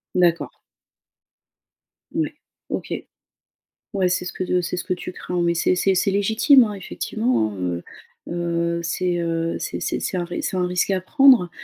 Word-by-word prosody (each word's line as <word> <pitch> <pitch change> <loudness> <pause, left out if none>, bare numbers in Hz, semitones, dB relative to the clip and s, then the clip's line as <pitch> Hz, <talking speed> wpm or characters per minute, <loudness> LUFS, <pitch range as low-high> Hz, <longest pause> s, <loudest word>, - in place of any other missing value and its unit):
D'accord. 175 -2 +2 1.6
Mouais. - - -1 0.4
OK. - - -3 1.0
Ouais 190 -2 +2
c'est 180 0 0
ce - - -5
que - - -3
de 180 0 +1
c'est 175 - -3
ce 175 - -2
que 185 - -1
tu 180 - -7
crains, 180 0 -3
mais 170 0 +2
c'est 170 +2 +2
c'est 190 +1 +2
c'est 195 +2 +2
légitime, 220 +7 +5
hein, 210 -2 -2
effectivement, 200 - -1
hein, - - -9
heu, 90 -1 -2 0.5
heu, 170 0 -1
c'est, 175 +1 -1
heu, 165 0 -1
c'est - - -4
c'est - - -1
c'est 185 - -2
un 175 - 0
ris 175 0 -4
c'est 190 - -2
un 180 - +2
risque 180 +1 0
à 190 -1 +2
prendre. 255 - +5
180 Hz, 180 wpm, -22 LUFS, 170-195 Hz, 1.6 s, légitime